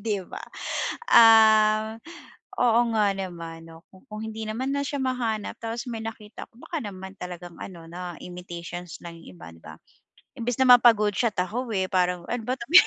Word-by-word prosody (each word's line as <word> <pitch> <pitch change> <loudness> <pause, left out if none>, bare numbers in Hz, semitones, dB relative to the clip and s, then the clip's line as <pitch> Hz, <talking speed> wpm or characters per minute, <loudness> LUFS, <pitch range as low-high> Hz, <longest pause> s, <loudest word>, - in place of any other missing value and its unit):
'di 210 -2 -1
ba. - - -8 0.7
Ah, 220 -1 +6 0.6
oo 235 -1 +4 0.2
nga 205 -2 +3
naman 170 -4 -7 0.2
kung, 185 - -18
kung 215 -2 -7
hindi 220 0 -6
naman 260 +5 -2
na 280 - 0
siya 285 +1 -3
mahanap 245 -5 -2
tapos 230 +2 -4
may 230 -2 -5
nakita 225 -1 -8
ko - - -27
baka 325 +5 -5
naman 190 -2 -8
talagang 175 -1 -8
ano 170 -3 -9
na 175 0 -7
imitations 175 -1 -8
lang 170 -1 -9
'yong 90 - -14
iba 80 - -11
'di 85 - -18
ba - - -10 0.6
imbes 240 0 -2
na 260 - +4
mapa-goodshot 220 -2 +3
ako 230 +7 -3
eh, 190 -2 0
parang 180 -2 0
ano 245 -1 -2
ba 255 +3 -2
tong 235 +8 -8
215 Hz, 175 wpm, -25 LUFS, 180-230 Hz, 0.7 s, Ah